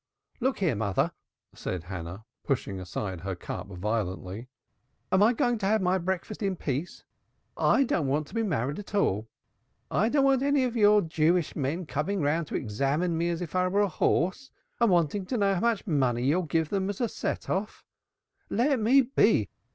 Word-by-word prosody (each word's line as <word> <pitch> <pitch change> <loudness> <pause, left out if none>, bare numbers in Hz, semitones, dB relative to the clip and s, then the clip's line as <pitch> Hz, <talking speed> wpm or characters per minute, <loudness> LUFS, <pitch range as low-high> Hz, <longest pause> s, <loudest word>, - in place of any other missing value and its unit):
"Look 265 +1 0
here, 180 -8 +1
mother!" 100 -3 0 0.4
cried 90 -3 -4
Hannah, 90 +3 -7 0.2
pushing 100 -8 -2
aside 95 0 -5
her 95 0 -3
cup 90 - -6
violently. 95 +2 -3 0.6
"Am 190 - +4
I 215 +3 +6
going 240 -1 +1
to 195 - -1
have 215 +2 +3
my 185 0 +1
breakfast 190 +4 -3
in 195 -2 0
peace? 150 +1 -4 0.5
I 275 - +3
don't 170 - 0
want 145 +3 0
to - - -16
be 230 - 0
married 145 - -1
at 205 0 -7
all. 110 - +1 0.6
I 220 +4 +2
don't 275 +1 +3
want 270 -1 +3
any 280 -1 +2
of 245 -2 -1
your 210 -2 +5
Jewish 160 +1 +1
men 155 +5 -2
coming 155 +7 -2
round 155 +1 0
to - - -5
examine 140 +10 0
me 170 +1 0
as 170 +1 -2
if! 165 - -8
were 185 +2 +1
a 205 - +3
horse, 190 +9 0 0.3
and 235 -2 +4
wanting 175 +2 +2
to 250 - -1
know 200 -2 +2
how 180 - -1
much 230 -3 +1
money 130 - +1
you'll 160 +6 +1
give 160 +1 0
them 195 -1 -1
as 200 - -4
a 240 - +1
set - - -4
off. 200 +3 -3 0.6
Let 260 +4 +2
me 245 +6 +5
be! 265 +3 +2
175 Hz, 190 wpm, -28 LUFS, 135-210 Hz, 0.6 s, I